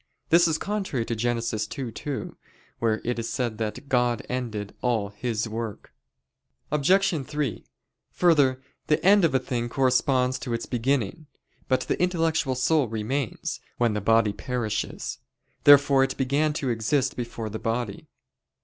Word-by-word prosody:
This 170 Hz, +1 st, +6 dB
is 160 Hz, -1 st, +1 dB
contrary 195 Hz, -, -2 dB
to 115 Hz, -, -2 dB
Gen. 120 Hz, +2 st, 0 dB
2:2, 115 Hz, +4 st, -4 dB, 0.5 s
where 110 Hz, -2 st, +1 dB
it 120 Hz, 0 st, -1 dB
is 115 Hz, -, -3 dB
said 120 Hz, -4 st, -2 dB
that 110 Hz, +5 st, -4 dB
"God 125 Hz, -3 st, +1 dB
ended" 110 Hz, -5 st, -4 dB
all 115 Hz, -5 st, 0 dB
"His 110 Hz, +2 st, -2 dB
work." 110 Hz, -1 st, -6 dB, 0.8 s
Obj. 165 Hz, +1 st, +3 dB
3: 140 Hz, -6 st, -3 dB, 0.5 s
Further, 140 Hz, -7 st, +3 dB, 0.2 s
the 150 Hz, -, +1 dB
end 200 Hz, 0 st, +6 dB
of 160 Hz, -5 st, +3 dB
a -, -, +5 dB
thing 120 Hz, -2 st, -3 dB
corresponds 130 Hz, 0 st, +2 dB
to 120 Hz, -3 st, -3 dB
its 115 Hz, -, -4 dB
beginning. 130 Hz, +3 st, -1 dB, 0.4 s
But 130 Hz, -, +2 dB
the -, -, -2 dB
intellectual 165 Hz, -6 st, +1 dB
soul 135 Hz, +2 st, +2 dB
remains, 115 Hz, +3 st, -3 dB, 0.2 s
when 120 Hz, -3 st, +2 dB
the 105 Hz, -, -2 dB
body 110 Hz, 0 st, +3 dB
perishes. 115 Hz, -1 st, -3 dB, 0.5 s
Therefore 140 Hz, -1 st, +7 dB
it 135 Hz, -, -2 dB
began 140 Hz, +3 st, +1 dB
to 135 Hz, -4 st, -1 dB
exist 130 Hz, +4 st, 0 dB
before 120 Hz, -3 st, -5 dB
the 110 Hz, -, -5 dB
body. 115 Hz, -2 st, -3 dB
125 Hz, 145 wpm, -26 LUFS, 115-145 Hz, 0.8 s, Therefore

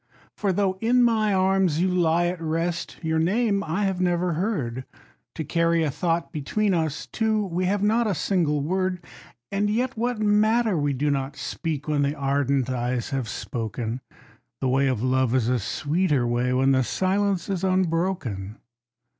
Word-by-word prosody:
For 200 Hz, -2 st, 0 dB
though 190 Hz, 0 st, 0 dB
in 245 Hz, +2 st, +4 dB
my 220 Hz, -3 st, +2 dB
arms 190 Hz, -4 st, +2 dB
you 180 Hz, -, +2 dB
lie 175 Hz, -2 st, +2 dB
at 175 Hz, -1 st, -2 dB
rest, 165 Hz, +2 st, -2 dB
your 160 Hz, 0 st, +1 dB
name 200 Hz, +4 st, +1 dB
I 165 Hz, +6 st, -1 dB
have 190 Hz, -2 st, 0 dB
never 175 Hz, -1 st, +1 dB
heard, 150 Hz, -, -2 dB, 0.5 s
To 160 Hz, -, -3 dB
carry 170 Hz, +2 st, +1 dB
a 150 Hz, -, 0 dB
thought 170 Hz, +3 st, -1 dB
between 190 Hz, +7 st, 0 dB
us 160 Hz, -3 st, -1 dB
two, 220 Hz, -2 st, 0 dB
we 180 Hz, 0 st, -2 dB
have 200 Hz, +2 st, 0 dB
not 225 Hz, +2 st, +2 dB
a 200 Hz, -, 0 dB
single 155 Hz, -4 st, +1 dB
word. 185 Hz, +1 st, -1 dB, 0.5 s
And 200 Hz, +1 st, 0 dB
yet 245 Hz, +5 st, 0 dB
what 240 Hz, +1 st, -1 dB
matter 215 Hz, +1 st, +3 dB
we 145 Hz, -2 st, 0 dB
do 145 Hz, +3 st, 0 dB
not 135 Hz, 0 st, -2 dB
speak, 150 Hz, 0 st, -4 dB
when 150 Hz, -1 st, +1 dB
the 140 Hz, +1 st, 0 dB
ardent 140 Hz, -2 st, 0 dB
eyes 125 Hz, 0 st, -2 dB
have 130 Hz, -5 st, -2 dB
spoken, 115 Hz, +2 st, -4 dB, 0.6 s
The 130 Hz, -, 0 dB
way 135 Hz, +2 st, +2 dB
of 125 Hz, -4 st, -1 dB
love 130 Hz, -1 st, +2 dB
is 120 Hz, -3 st, +2 dB
a 125 Hz, -1 st, +2 dB
sweeter 145 Hz, -, 0 dB
way, 120 Hz, +1 st, 0 dB
when 130 Hz, +1 st, +3 dB
the 130 Hz, -1 st, +3 dB
silence 190 Hz, -, 0 dB
is 190 Hz, -3 st, -2 dB
unbroken. 165 Hz, -, -1 dB
170 Hz, 170 wpm, -25 LUFS, 135-195 Hz, 0.6 s, in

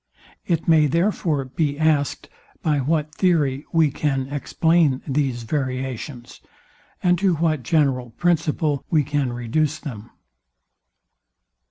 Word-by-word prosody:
It 165 Hz, -3 st, 0 dB
may, 160 Hz, -2 st, +5 dB
therefore, 165 Hz, -3 st, 0 dB
be 145 Hz, +2 st, -2 dB
asked, 155 Hz, -2 st, +1 dB, 0.4 s
by 150 Hz, -2 st, +2 dB
what 150 Hz, +2 st, -1 dB
theory 150 Hz, -7 st, +1 dB
we 160 Hz, -3 st, +3 dB
can 135 Hz, -2 st, -1 dB
explain 150 Hz, 0 st, +1 dB
these 135 Hz, -4 st, -1 dB
variations, 130 Hz, -1 st, -4 dB, 0.6 s
and 180 Hz, -2 st, +3 dB
to 190 Hz, -2 st, +2 dB
what 155 Hz, -3 st, 0 dB
general 130 Hz, -2 st, +1 dB
principle 155 Hz, 0 st, 0 dB
we 155 Hz, -3 st, +3 dB
can 140 Hz, -2 st, -1 dB
reduce 140 Hz, +6 st, -1 dB
them. 120 Hz, -9 st, -8 dB
150 Hz, 115 wpm, -22 LUFS, 130-160 Hz, 0.6 s, may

